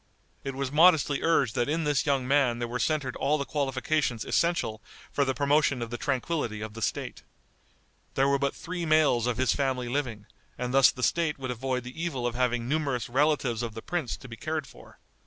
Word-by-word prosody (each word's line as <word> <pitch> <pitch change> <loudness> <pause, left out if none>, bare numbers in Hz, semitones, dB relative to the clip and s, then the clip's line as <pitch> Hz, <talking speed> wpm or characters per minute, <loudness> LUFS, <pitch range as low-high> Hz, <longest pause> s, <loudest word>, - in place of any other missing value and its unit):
It 135 -1 -4
was 135 -1 -3
modestly 155 -2 +5
urged 140 -8 +2
that 120 +3 0
in 160 +2 0
this 145 0 +1
young 135 -3 +1
man 135 -4 +3
there 120 0 -3
were 125 +1 -4
centered 145 -4 0
all 150 +2 +1
the 140 - -3
qualifications 135 -3 -1
essential 170 -11 0 0.3
for 140 - +1
the 130 -1 -1
promotion 145 -1 +2
of 115 - -7
the 120 - -3
tranquillity 135 -4 -1
of 110 0 -6
the 115 - -8
State. - - -3 0.9
There 135 +1 +3
were 140 0 +2
but 140 0 -1
three 175 0 -5
males 155 -7 +3
of 125 - 0
his 130 -1 +2
family 130 -3 -1
living, 120 -5 -3 0.3
and 125 0 -3
thus 135 -1 +7
the 125 - -5
State 165 0 +1
would 130 -2 -4
avoid 125 +1 -2
the 125 +6 -8
evil 135 -8 -2
of 120 - 0
having 120 -1 0
numerous 140 -5 -1
relatives 135 -3 +1
of 115 -2 -4
the 115 - -7
prince 170 -9 -2
to 135 - -12
be 115 - -8
cared 155 +4 -3
for. - - -16
135 Hz, 210 wpm, -28 LUFS, 120-150 Hz, 0.9 s, thus